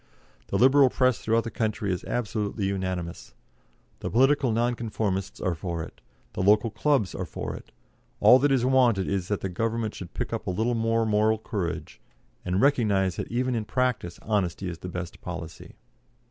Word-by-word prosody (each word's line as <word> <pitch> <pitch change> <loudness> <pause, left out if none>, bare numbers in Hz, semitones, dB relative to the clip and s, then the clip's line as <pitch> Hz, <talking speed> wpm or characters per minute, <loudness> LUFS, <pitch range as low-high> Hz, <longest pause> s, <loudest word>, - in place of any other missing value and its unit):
The 100 - -1
Liberal 135 +4 +6
Press 130 -1 +2
throughout 115 +1 +1
the 115 - -5
country 105 -3 -1
is 90 - -4
absolutely 105 -3 -2
unanimous. 95 -3 -4 0.6
The - - -4
political 135 +1 +3
Non 120 +2 +1
conformists 105 -5 -3
are 90 - 0
for 85 0 -4
it. - - -12 0.3
The - - -3
local 105 +3 +4
clubs 135 - +1
are - - -3
for - - -5
it. - - -12 0.5
All 125 - +7
that 145 +2 +2
is 130 -2 +2
wanted 125 -7 +3
is 95 -3 -1
that 105 - -2
the 95 - -2
Government 115 +3 -2
should 90 - -9
pick - - -3
up - - -4
a - - +1
little 110 +6 0
more 115 0 +1
moral 110 +1 +2
courage, 100 -5 -4 0.4
and 90 +1 0
recognise 105 -9 +2
that - - -5
even 125 +2 0
in 115 -2 -1
practice 125 -8 -1
honesty 100 -3 -1
is 85 -2 -6
the 90 - -6
best 90 -1 -6
policy." 85 -2 -8
110 Hz, 180 wpm, -26 LUFS, 95-120 Hz, 0.6 s, All